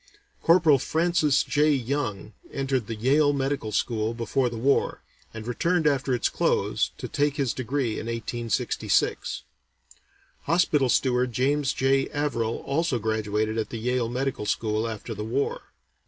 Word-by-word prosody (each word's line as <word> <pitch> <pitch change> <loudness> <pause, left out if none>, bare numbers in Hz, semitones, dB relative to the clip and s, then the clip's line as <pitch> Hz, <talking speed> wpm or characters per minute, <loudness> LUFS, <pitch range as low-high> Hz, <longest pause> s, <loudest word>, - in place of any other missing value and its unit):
Corporal 165 -5 +5
Francis 160 -1 +2
J. 150 +1 +2
Young 125 -6 -1 0.2
entered 135 -4 -1
the 115 - -4
Yale 145 +6 +3
Medical 135 -5 -2
School 110 +1 -1
before 120 +2 0
the 115 - -6
war, 135 +5 +1 0.3
and 110 -1 -8
returned 165 +8 0
after 135 -3 +2
its 120 - +1
close - - 0
to - - -5
take 145 0 0
his 135 -5 0
degree 130 -2 -2
in - - -6
1866. 115 -1 -1 1.0
Hospital 150 -5 +2
Steward 125 -1 +2
James 135 +3 +1
J. 135 +1 +1
Averill 130 -6 -2
also 145 -1 0
graduated 110 0 -1
at 110 - -2
the 115 - -5
Yale 120 +1 -1
Medical 125 -3 -2
School 110 +1 0
after 115 +1 -5
the 105 0 -5
war. 125 +6 -2
130 Hz, 140 wpm, -26 LUFS, 115-145 Hz, 1.0 s, Corporal